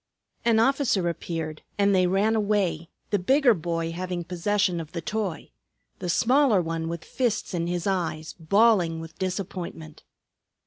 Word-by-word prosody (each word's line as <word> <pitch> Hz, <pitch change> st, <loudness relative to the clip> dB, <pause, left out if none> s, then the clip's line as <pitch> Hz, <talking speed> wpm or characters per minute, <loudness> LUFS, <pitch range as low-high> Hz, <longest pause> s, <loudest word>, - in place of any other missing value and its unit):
An 230 Hz, -2 st, +3 dB
officer 245 Hz, -7 st, +2 dB
appeared, 160 Hz, -2 st, -5 dB, 0.2 s
and 200 Hz, 0 st, +3 dB
they 185 Hz, -1 st, +4 dB
ran 200 Hz, +5 st, +2 dB
away, 200 Hz, -6 st, 0 dB, 0.2 s
the 205 Hz, -, +2 dB
bigger 265 Hz, +6 st, +4 dB
boy 165 Hz, -2 st, -2 dB
having 180 Hz, 0 st, -4 dB
possession 180 Hz, +1 st, 0 dB
of 160 Hz, -1 st, -8 dB
the 170 Hz, -, -3 dB
toy; 205 Hz, -2 st, -3 dB, 0.5 s
the 180 Hz, -, -4 dB
smaller 245 Hz, +3 st, +4 dB
one 165 Hz, -1 st, -2 dB
with 170 Hz, -1 st, -5 dB
fists 240 Hz, -7 st, -1 dB
in 170 Hz, -1 st, -1 dB
his 175 Hz, -1 st, -2 dB
eyes, 170 Hz, -5 st, -2 dB
bawling 180 Hz, -1 st, +3 dB
with 165 Hz, 0 st, -10 dB
disappointment. 180 Hz, -4 st, -5 dB
180 Hz, 145 wpm, -26 LUFS, 165-210 Hz, 0.5 s, they